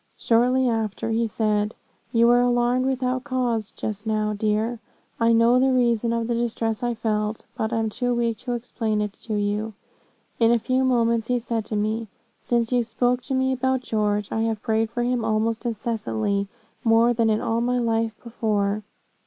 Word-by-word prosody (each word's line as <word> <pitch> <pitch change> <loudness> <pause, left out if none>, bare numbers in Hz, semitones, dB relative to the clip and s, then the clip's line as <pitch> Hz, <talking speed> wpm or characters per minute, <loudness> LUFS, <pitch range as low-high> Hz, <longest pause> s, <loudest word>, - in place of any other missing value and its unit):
Shortly 250 +3 +3
after, 225 -1 -1
he 230 +1 +1
said, 210 -1 0 0.4
'You 235 -1 +4
were 240 +1 +5
alarmed 245 +1 +2
without 255 -1 -1
cause 245 -6 -1
just 210 0 -5
now, 215 -1 0
dear 215 +3 0 0.4
I 230 0 +4
know 230 +2 +5
the 265 +1 +3
reason 235 -2 +2
of 230 0 0
the 240 - 0
distress 230 -2 -1
I 240 -1 -1
felt, 215 -1 -2
but 220 +1 -2
am 225 -1 0
too 245 +2 -1
weak 230 -2 0
to 245 - -4
explain 225 -2 -2
it 210 -1 -2
to 220 - -3
you.' 205 +1 -1 0.6
In 230 -1 +5
a 235 - +5
few 255 +3 0
moments 235 -3 +2
he 250 - +1
said 230 -2 -2
to 215 - -3
me, 215 +2 -1 0.3
'Since 235 -1 0
you 250 -1 +3
spoke 245 +2 0
to 270 - -2
me 260 0 +1
about 260 0 0
George, 210 -3 -1
I 225 - 0
have 225 -2 -1
prayed 220 -1 +1
for 240 +1 -2
him 245 -1 0
almost 225 +2 0
incessantly 200 - -2 0.4
more 230 0 +4
than 230 -1 +2
in 215 0 +2
all 230 +1 0
my 250 +1 +1
life 225 -2 0
before.' 215 -3 -1
230 Hz, 185 wpm, -24 LUFS, 220-245 Hz, 0.6 s, were